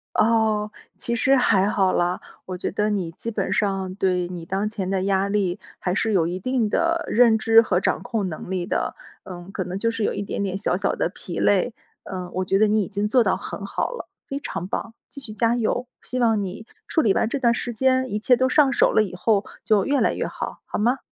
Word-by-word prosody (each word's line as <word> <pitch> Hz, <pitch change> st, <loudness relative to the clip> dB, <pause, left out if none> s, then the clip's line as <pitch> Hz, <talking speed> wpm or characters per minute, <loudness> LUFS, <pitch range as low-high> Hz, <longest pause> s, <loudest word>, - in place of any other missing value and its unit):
哦， 215 Hz, -2 st, +2 dB, 0.3 s
其 235 Hz, -, -2 dB
实 265 Hz, +4 st, +3 dB
还 200 Hz, -5 st, +3 dB
好 195 Hz, -3 st, +2 dB
啦。 175 Hz, +1 st, +1 dB, 0.3 s
我 185 Hz, -, -4 dB
觉 -, -, -2 dB
得 210 Hz, +1 st, 0 dB
你 190 Hz, -6 st, -1 dB
基 230 Hz, +7 st, -6 dB
本 195 Hz, -3 st, -1 dB
上 195 Hz, -2 st, -1 dB
对 180 Hz, -2 st, 0 dB
你 175 Hz, -2 st, -7 dB
当 195 Hz, +4 st, -1 dB
前 195 Hz, -3 st, -4 dB
的 190 Hz, -1 st, 0 dB
压 195 Hz, 0 st, +1 dB
力 195 Hz, -3 st, 0 dB, 0.2 s
还 180 Hz, 0 st, -1 dB
是 220 Hz, +2 st, +1 dB
有 170 Hz, -5 st, +2 dB
一 180 Hz, +2 st, -3 dB
定 250 Hz, +2 st, 0 dB
的 335 Hz, +6 st, +1 dB
认 230 Hz, -1 st, +5 dB
知 225 Hz, +1 st, +6 dB
和 185 Hz, -5 st, +1 dB
掌 190 Hz, -, 0 dB
控 225 Hz, -5 st, -2 dB
能 175 Hz, +1 st, -7 dB
力 185 Hz, -2 st, -1 dB
的。 -, -, -2 dB, 0.3 s
呃， 175 Hz, -1 st, -9 dB
可 185 Hz, -, -2 dB
能 180 Hz, +1 st, -5 dB
就 230 Hz, +3 st, +1 dB
是 225 Hz, -1 st, -3 dB
有 -, -, +1 dB
一 -, -, -3 dB
点 200 Hz, -, -4 dB
点 190 Hz, -1 st, -2 dB
小 195 Hz, -, 0 dB
小 195 Hz, +2 st, 0 dB
的 -, -, 0 dB
疲 175 Hz, -2 st, -7 dB
累。 205 Hz, +4 st, +2 dB, 0.3 s
呃， 185 Hz, -2 st, -6 dB
我 185 Hz, -, -1 dB
觉 195 Hz, -, +2 dB
得 215 Hz, -, +5 dB
你 215 Hz, +1 st, +2 dB
已 195 Hz, -, -2 dB
经 205 Hz, 0 st, -1 dB
做 240 Hz, +2 st, +4 dB
到 -, -, +1 dB
很 -, -, -7 dB
好 -, -, -2 dB
了， -, -, -7 dB, 0.2 s
非 275 Hz, -, -4 dB
常 180 Hz, -, -5 dB
棒， 225 Hz, +3 st, -4 dB
继 280 Hz, -, -10 dB
续 240 Hz, -5 st, -6 dB
加 230 Hz, +2 st, +2 dB
油。 245 Hz, +1 st, -1 dB
希 255 Hz, -, -4 dB
望 225 Hz, -4 st, +2 dB
你 195 Hz, +3 st, -6 dB, 0.2 s
处 320 Hz, -, +2 dB
理 210 Hz, -7 st, +3 dB
完 220 Hz, -, +1 dB
这 280 Hz, -, -2 dB
段 235 Hz, -3 st, +3 dB
时 240 Hz, -, -3 dB
间， 260 Hz, +2 st, +2 dB
一 210 Hz, -, -1 dB
切 250 Hz, +4 st, +4 dB
都 260 Hz, +1 st, +1 dB
上 275 Hz, -2 st, +4 dB
手 -, -, +4 dB
了 215 Hz, -, +4 dB
以 195 Hz, -, -6 dB
后 200 Hz, +2 st, +1 dB, 0.2 s
就 210 Hz, -3 st, +3 dB
越 280 Hz, -1 st, +1 dB
来 -, -, +2 dB
越 -, -, -2 dB
好， -, -, -5 dB
好 -, -, -4 dB
吗？ 245 Hz, +5 st, +2 dB
210 Hz, 260 characters per minute, -23 LUFS, 190-235 Hz, 0.3 s, 知